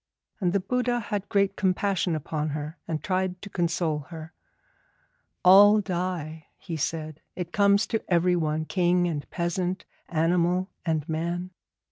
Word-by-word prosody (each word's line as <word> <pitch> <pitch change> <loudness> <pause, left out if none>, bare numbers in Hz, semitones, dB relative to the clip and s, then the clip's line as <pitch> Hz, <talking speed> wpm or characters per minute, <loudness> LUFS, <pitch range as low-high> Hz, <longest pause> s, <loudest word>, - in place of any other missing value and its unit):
And 180 -4 +1
the 200 - +2
Buddha 245 +5 0
had 205 -3 -4
great 200 -2 +2
compassion 190 -2 0
upon 155 0 -3
her, 150 +3 -7
and 160 -2 -3
tried 185 -1 -1
to 200 - -8
console 170 -3 0
her. 160 -1 -9 1.1
'All 205 +3 +8
die,' 175 -5 -3
he 170 - -6
said; 155 0 -3
'it 175 -2 -5
comes 200 +1 +4
to 225 - -2
everyone, 165 -3 +2
king 175 0 +2
and 150 -4 -4
peasant, 180 +2 -2 0.2
animal 175 +3 +1 0.2
and 155 -2 0
man. 170 +3 -3
175 Hz, 135 wpm, -26 LUFS, 160-190 Hz, 1.1 s, All